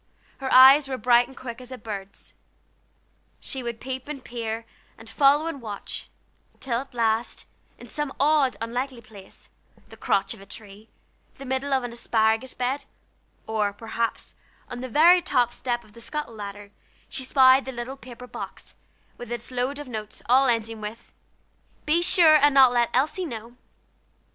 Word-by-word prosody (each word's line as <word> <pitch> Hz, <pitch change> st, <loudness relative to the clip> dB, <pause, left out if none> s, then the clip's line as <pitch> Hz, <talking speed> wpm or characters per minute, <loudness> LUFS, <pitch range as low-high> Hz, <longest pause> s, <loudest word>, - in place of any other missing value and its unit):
Her 265 Hz, -1 st, -3 dB
eyes 270 Hz, +3 st, +8 dB
were 265 Hz, -1 st, -3 dB
bright 240 Hz, +1 st, +4 dB
and 265 Hz, -, -16 dB
quick 240 Hz, -1 st, -7 dB
as 250 Hz, 0 st, -11 dB
a 255 Hz, -, -6 dB
bird's. 200 Hz, -4 st, -8 dB, 1.1 s
She 265 Hz, -, -5 dB
would 235 Hz, -2 st, -5 dB
peep 260 Hz, 0 st, -6 dB
and 285 Hz, -3 st, -7 dB
peer, 230 Hz, -1 st, -5 dB, 0.3 s
and 225 Hz, -, -14 dB
follow 285 Hz, +6 st, +3 dB
and 330 Hz, -5 st, -5 dB
watch, 210 Hz, -3 st, -7 dB, 0.5 s
till 240 Hz, -3 st, -2 dB
at 265 Hz, -1 st, -10 dB
last, 225 Hz, 0 st, 0 dB, 0.3 s
in -, -, -12 dB
some 295 Hz, -2 st, -4 dB
odd, 285 Hz, -2 st, +3 dB
unlikely 245 Hz, +2 st, -3 dB
place, 205 Hz, -4 st, -15 dB, 0.4 s
the -, -, -12 dB
crotch 195 Hz, -, 0 dB
of 220 Hz, -, -14 dB
a -, -, -12 dB
tree, 210 Hz, 0 st, -11 dB, 0.5 s
the 275 Hz, -, -10 dB
middle 265 Hz, +2 st, -2 dB
of 265 Hz, -2 st, +2 dB
the 245 Hz, -, -5 dB
asparagus 225 Hz, +1 st, 0 dB
bed, 265 Hz, +3 st, -2 dB, 0.6 s
or, 210 Hz, -2 st, -1 dB
perhaps, 225 Hz, +2 st, -4 dB, 0.4 s
on 245 Hz, -, -6 dB
the 255 Hz, -, -5 dB
very 340 Hz, +8 st, +6 dB
top 245 Hz, -8 st, +1 dB
step 240 Hz, -1 st, -3 dB
of 210 Hz, -, -21 dB
the 235 Hz, -, -12 dB
scuttle 295 Hz, -1 st, -5 dB
ladder, 205 Hz, -1 st, -8 dB, 0.4 s
she 265 Hz, -, -5 dB
spied 260 Hz, 0 st, +5 dB
the 265 Hz, -, -5 dB
little 245 Hz, +2 st, -6 dB
paper 250 Hz, -2 st, -11 dB
box, -, -, -9 dB, 0.5 s
with 240 Hz, -1 st, -8 dB
its 240 Hz, +1 st, -5 dB
load 255 Hz, +3 st, -2 dB
of 290 Hz, -1 st, -7 dB
notes, 215 Hz, -3 st, -7 dB
all 260 Hz, +3 st, +5 dB
ending 225 Hz, -2 st, -1 dB
with: 210 Hz, +2 st, -8 dB, 0.7 s
"Be 320 Hz, +3 st, +3 dB
sure 340 Hz, -3 st, +6 dB
and 290 Hz, -1 st, +4 dB
not 260 Hz, -2 st, +7 dB
let 240 Hz, -1 st, +2 dB
Elsie 300 Hz, +8 st, 0 dB
know." 235 Hz, -4 st, -8 dB
245 Hz, 170 wpm, -25 LUFS, 225-270 Hz, 1.1 s, eyes